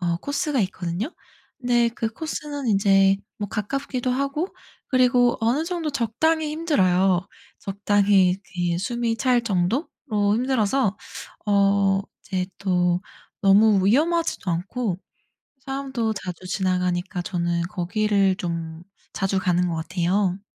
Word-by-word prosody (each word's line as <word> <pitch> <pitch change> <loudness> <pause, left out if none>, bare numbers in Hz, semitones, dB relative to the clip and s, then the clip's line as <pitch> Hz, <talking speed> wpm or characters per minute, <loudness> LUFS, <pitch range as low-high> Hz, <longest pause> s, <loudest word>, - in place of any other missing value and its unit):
어 170 -1 0
코스가 285 - -1
있거든요? 185 - -2 0.5
근데 240 -2 +2
그 230 -1 -3
코스는 295 0 -5
인제 195 -1 +4 0.2
뭐 205 -1 -3
가깝기도 255 +4 -2
하고 275 +7 -1 0.4
그리고 250 -1 +3
어느 240 +8 +1
정도 335 -3 -2
적당히 295 +5 0
힘들어요. 190 - +2 0.3
적당히 200 -2 +2 0.2
이 175 -1 0
숨이 235 +3 -1
찰 250 0 +2
정도로 215 - 0 0.5
힘들어서 235 -2 +1 0.5
어 200 -1 +3 0.2
이제 185 -2 -3
또 180 -2 +1 0.4
너무 200 0 +5
위험하지도 310 - +1
않고 185 +3 -2 0.7
사람도 270 -5 -2
자주 185 -3 -7
지나가니까 180 0 -1
저는 170 -1 -1
거기를 195 +2 +1
좀 165 -2 -5 0.3
자주 195 0 0
가는 180 -1 +1
것 170 - -2
같아요. 180 +3 0
200 Hz, 255 characters per minute, -23 LUFS, 185-250 Hz, 0.7 s, 너무